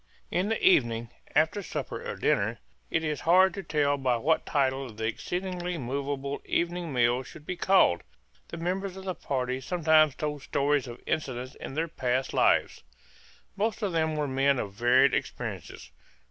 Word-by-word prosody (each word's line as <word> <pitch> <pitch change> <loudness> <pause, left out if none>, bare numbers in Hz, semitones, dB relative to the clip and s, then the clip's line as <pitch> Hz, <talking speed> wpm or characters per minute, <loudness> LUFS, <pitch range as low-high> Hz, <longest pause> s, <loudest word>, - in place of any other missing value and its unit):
In 185 +4 0
the 225 - 0
evenings, 120 -9 +3 0.2
after 160 +7 +3
supper - - -5
or - - -4
dinner - - +1 0.3
it 160 - 0
is 155 -2 -2
hard 185 +3 +5
to 195 - -5
tell 150 -4 +1
by 130 -3 +1
what 155 +7 +1
title 135 -3 0
the 110 +1 -5
exceedingly 180 +8 -3
movable 140 +1 -3
evening 175 -1 -1
meal 120 -1 +2
should 150 +3 -12
be 180 - -3
called 185 - +4 0.5
the 170 - -7
members 185 +3 -3
of 190 - -9
the 185 - -1
party 130 -4 -2
sometimes 155 -2 +3
told 150 -2 -3
stories 140 -1 +1
of 120 0 -8
incidents 130 -4 -3
in 135 - -8
their 165 +2 0
past 130 -4 -1
lives. - - +2 0.7
Most 215 +2 -1
of 200 - 0
them 160 -2 0
were 150 -1 -1
men 135 +1 +2
of 100 -5 -4
varied 125 +5 +4
experiences. - - -4
145 Hz, 165 wpm, -28 LUFS, 130-175 Hz, 0.7 s, hard